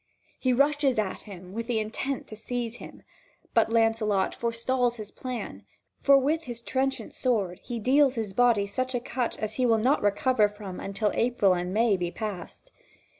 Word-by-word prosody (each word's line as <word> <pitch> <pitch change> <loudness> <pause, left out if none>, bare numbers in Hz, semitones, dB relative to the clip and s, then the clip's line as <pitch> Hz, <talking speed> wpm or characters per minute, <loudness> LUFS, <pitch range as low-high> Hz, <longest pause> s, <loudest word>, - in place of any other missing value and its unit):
He 255 - +1
rushes 280 0 +2
at 210 -3 -1
him 185 -1 -10
with 230 +2 -4
the 240 -2 0
intent 235 +5 -3
to 215 - -7
seize 235 +1 -4
him, - - -12 0.5
but 225 -1 +3
Lancelot 225 -3 +2
forestalls 240 +1 0
his 215 -3 -8
plan, 235 - -6 0.4
for 275 0 +6
with 305 +5 0
his 240 -2 -5
trenchant 265 +2 -1
sword 205 -9 0
he 240 - -4
deals 265 +4 +3
his 220 -4 -3
body 235 -2 +3
such 255 +5 -2
a - - +1
cut 245 0 -3
as 215 0 -3
he - - +4
will 225 -1 +4
not 255 +7 +2
recover 210 +2 +3
from 205 -3 -8
until 200 +2 -1
April 230 -5 +3
and 180 0 -2
May 215 0 +3
be 175 -1 -2
passed. 210 - -7
230 Hz, 175 wpm, -27 LUFS, 205-255 Hz, 0.5 s, for